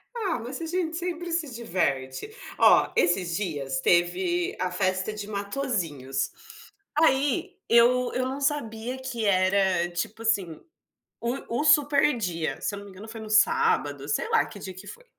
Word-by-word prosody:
Ah, 390 - -1
mas 250 +6 -6
a - - -3
gente 330 -1 -2
sempre 350 0 -4
se 330 -3 -1
diverte. 165 - -2 0.3
Ó, - - +5
esses 175 -1 +2
dias 145 -9 -2
teve 350 - +1
a 185 0 -1
festa 185 +2 0
de 210 -1 -6
Matosinhos. 190 - -2 0.7
Aí 300 +4 +2
eu 245 +2 +4
eu 255 0 0
não 265 +2 -4
sabia 250 -4 -2
que 260 -4 -4
era, 185 -2 +2
tipo 175 +6 -3
assim, 195 -8 0 0.6
o 235 0 -3
o - - -1
super 295 -2 +4
dia. 170 -7 -2
Se 205 - -2
eu - - -7
não 200 - -11
me 200 - -12
engano 195 +4 -11
foi 225 0 -8
no 215 - -8
sábado, 455 - +2
sei 480 - 0
lá 460 - +3
que - - -11
dia 190 - -7
que 190 +3 -11
foi. - - -11
225 Hz, 165 wpm, -26 LUFS, 185-295 Hz, 0.7 s, Ó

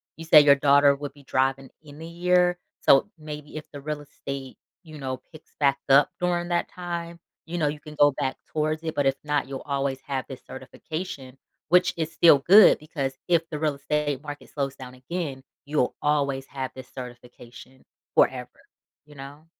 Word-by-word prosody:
You 165 - -9
say 160 -1 +8
your 145 -1 +6
daughter 140 0 +5
would 145 0 -7
be 145 -1 -18
driving 135 0 0
in 150 0 -13
a - - -7
year, 180 +1 +2 0.2
so 140 +9 +5
maybe 150 -1 -8
if 155 - -7
the 145 - -9
real 150 +1 -4
estate, 140 -2 -8 0.3
you 155 -3 -11
know, 130 -2 -4
picks 155 -1 -16
back 140 -2 +3
up 135 +1 +6
during 175 -1 0
that 175 0 0
time, 170 -1 -6 0.3
you 170 +2 -5
know, 155 -3 +1
you 150 +1 -3
can 150 0 -12
go 145 0 +6
back 130 -1 -3
towards 155 0 -1
it, 160 -1 -4
but 145 - +1
if 135 - +2
not, 150 -2 0
you'll 135 -1 -6
always 140 -1 -2
have 135 -2 -2
this 130 -1 -8
certification, 135 0 -7 0.3
which 180 +1 +4
is 160 0 -3
still 160 -2 +6
good 195 +8 +7
because 140 -4 -4
if 170 -2 +2
the 150 - -5
real 150 -2 0
estate 145 0 -2
market 145 -1 -8
slows 140 -2 -3
down 125 -1 -10
again, 135 0 -5 0.2
you'll 145 -3 0
always 140 -2 0
have 130 -2 -5
this 130 -1 -10
certification 125 0 -11 0.3
forever, - - +2 0.6
you 150 0 -17
know? 140 +3 -11
145 Hz, 185 wpm, -25 LUFS, 135-160 Hz, 0.6 s, say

